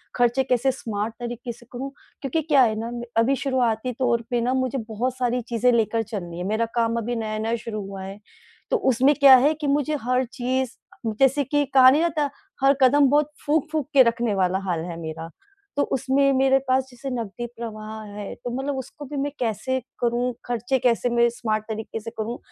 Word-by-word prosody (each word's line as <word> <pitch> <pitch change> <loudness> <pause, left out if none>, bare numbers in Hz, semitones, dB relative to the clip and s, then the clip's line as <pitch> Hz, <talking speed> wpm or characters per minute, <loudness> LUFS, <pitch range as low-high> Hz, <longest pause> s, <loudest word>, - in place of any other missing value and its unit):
खर्चे 245 +2 +2
कैसे 255 0 +2
स्मार्ट 220 -3 -4
तरीके 240 0 -5
से 240 +1 -14
करूँ। 260 +2 -5 0.3
क्योंकि 280 +4 -1
क्या 290 -3 +4
है 220 -3 +2
ना 230 +1 -4 0.3
अभी 235 +4 +4
शुरुआती 255 -3 0
तौर 240 -3 +2
पे 240 -1 0
ना 250 +2 +1
मुझे 260 0 0
बहुत 245 +4 -2
सारी 250 0 0
चीज़ें 240 +1 +3
लेकर 225 -1 +1
चलनी 175 -6 -6
हैं, 180 - -4
मेरा 220 +3 +1
काम 230 -1 +1
अभी 235 +1 -2
नया-नया 220 0 -2
शुरू 220 -2 -5
हुआ 195 -1 -7
है। 195 +2 -8 0.5
तो - - +4
उसमें 265 - +3
क्या 275 -2 +9
है 285 +5 +3
कि 305 -1 -4
मुझे 290 +2 +1
हर 250 +2 +1
चीज़ 255 +1 -2 0.5
जैसे 270 +2 +4
कि 290 +2 +1
कहा 260 -1 +9
नहीं 290 +4 +3
जाता 310 -4 +1 0.3
हर 275 +1 +6
कदम 275 +2 +5
बहुत 295 +1 +2
फूँक-फूँक 305 -1 0
के 270 -2 +8
रखने 235 -2 0
वाला 190 0 +1
हाल 175 -3 0
है 170 -2 -6
मेरा। 160 0 -6 0.5
तो 285 - +3
उसमें 270 +2 +2
मेरे 270 0 +4
पास 260 +1 +3
जैसे 245 +2 -7
नकदी 240 -2 -4
प्रवाह 220 -1 -6 0.2
है, 205 -1 -6
तो 245 - -7
मतलब 270 +1 -2
उसको 270 +3 -8
भी 290 +1 -6
मैं 285 +1 -1
कैसे 240 +3 -1 0.2
करूँ? 240 +1 0
खर्चे 245 +2 -1
कैसे 245 0 +2
मैं 235 0 +4
स्मार्ट 220 -3 -2
तरीके 220 0 -4
से 230 +1 -8
करूँ? 225 +3 -3
245 Hz, 195 wpm, -24 LUFS, 225-270 Hz, 0.5 s, क्या